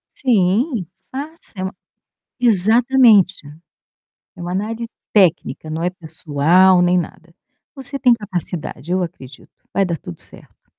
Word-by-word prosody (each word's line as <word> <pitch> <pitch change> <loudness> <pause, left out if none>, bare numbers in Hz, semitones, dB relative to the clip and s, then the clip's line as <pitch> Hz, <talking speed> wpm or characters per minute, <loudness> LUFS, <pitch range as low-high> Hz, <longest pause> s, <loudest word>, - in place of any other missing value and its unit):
Sim, 225 - +1 0.3
faça, 300 +5 -8
é 185 - -3
uma 190 0 -5 0.6
Exatamente. 225 -2 +5 1.0
É 175 - -9
uma 175 +1 -4
análise 225 +4 -3 0.3
técnica, 175 -5 +2
não 160 +1 -3
é 175 - +1
pessoal, 175 +2 +2
nem 180 +1 +3
nada. 170 0 -7 0.4
Você 275 0 -4
tem 250 -3 +4
capacidade, 175 - -4
eu 185 0 +1
acredito, 140 -6 -9 0.2
vai 195 - +2
dar 170 -2 -2
tudo 85 - -7
certo. - - -6
185 Hz, 130 wpm, -19 LUFS, 175-230 Hz, 1.0 s, Exatamente